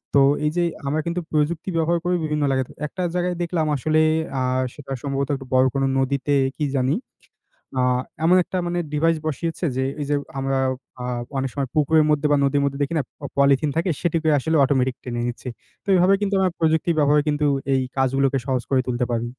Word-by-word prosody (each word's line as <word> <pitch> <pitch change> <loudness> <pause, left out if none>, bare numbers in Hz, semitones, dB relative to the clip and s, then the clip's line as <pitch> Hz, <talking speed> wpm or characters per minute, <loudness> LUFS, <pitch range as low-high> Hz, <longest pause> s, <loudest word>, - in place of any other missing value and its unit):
তো - - +7 0.3
এই 150 - +2
যে 175 - +3 0.2
আমরা 155 +3 0
কিন্তু 170 +1 -1
প্রযুক্তি 155 +3 0
ব্যবহার 165 +1 +2
করি 180 0 +2
বিভিন্ন 150 -1 -1
জায়গাতে। 130 -1 -1 0.2
একটা 185 +4 -5
জায়গায় 180 0 0
দেখলাম 165 -2 -1
আসলে 155 +4 +1 0.4
আ - - 0 0.3
সেটা 140 -2 -11
সম্ভবত 140 -1 -1
একটু 135 -1 -9
বড় 130 0 +5
কোনো 135 0 +1
নদীতে 140 +2 0 0.2
কি 150 - 0
জানি? 130 +3 +1 0.8
আ - - +3 0.4
এমন 180 +3 +5
একটা 185 - -4
মানে 175 0 -1
ডিভাইস 165 +2 +2
বসিয়েছে, 165 +4 -2
যে 130 - +1 0.2
এই 145 - -2
যে 145 - +2 0.2
আমরা 135 0 0 0.4
আ 125 - -4 0.3
অনেক 135 0 -1
সময় 140 -3 -2
পুকুরের 155 +1 +4
মধ্যে 150 0 +2
বা - - +5
নদীর 140 +1 +2
মধ্যে 140 0 -2
দেখি 140 - -3
না - - 0 0.3
পলিথিন 140 +1 +4
থাকে? 170 +3 +1
সেটিকে 165 -2 +1
আসলে 160 +4 +1
অটোমেটিক 130 -2 +1
টেনে 120 -1 -3
নিচ্ছি। 120 +1 -5 0.4
তো - - -6
এভাবে 185 +2 +5
কিন্তু 200 -1 0
আমরা 190 -1 +2
প্রযুক্তির 160 +1 +2
ব্যবহারে 150 0 +4
কিন্তু, 150 0 0 0.3
এই 130 - +2 0.2
কাজগুলোকে 135 +1 +2
সহজ 130 -2 0
করে 130 -1 +4
তুলতে 125 0 0
পারি। 115 0 -1
145 Hz, 195 wpm, -22 LUFS, 135-165 Hz, 0.8 s, তো